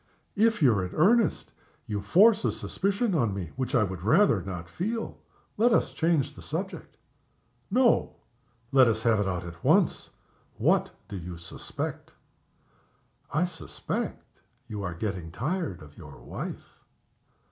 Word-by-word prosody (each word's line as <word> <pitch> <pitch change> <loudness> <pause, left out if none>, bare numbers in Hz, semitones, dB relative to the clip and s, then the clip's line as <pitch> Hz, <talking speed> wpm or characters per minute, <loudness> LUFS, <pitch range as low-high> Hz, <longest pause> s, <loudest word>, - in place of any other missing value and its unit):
If 225 -4 +3
you're 110 -8 +4
in 90 +1 -6
earnest 220 +8 +3 0.3
you 105 -2 -3
force 205 - +5
a - - +2
suspicion 200 +2 -1
on 115 - +1
me 90 -5 -5
which 130 +1 -2
I 120 - +5
would 95 -3 -4
rather 120 - +4
not 90 -2 -6
feel. 225 - -4 0.4
Let 235 +3 +4
us - - +2
change 160 -4 +1
the - - -12
subject." - - -5 0.7
"No! 245 +3 +3 0.6
Let 130 -2 +6
us 110 -1 0
have 115 -3 +3
it 100 - 0
out 90 -1 -2
at 85 -1 -10
once. - - +3 0.5
What - - +2 0.2
do 105 - -7
you 90 0 -7
suspect?" 85 - -6 1.2
"I 155 +5 +2
suspect 80 - -5 0.3
you 105 -3 -5
are 90 -4 -4
getting 90 -3 -4
tired 135 - -3
of 75 -1 -15
your - - -11
wife." - - -8
115 Hz, 145 wpm, -28 LUFS, -, 1.2 s, Let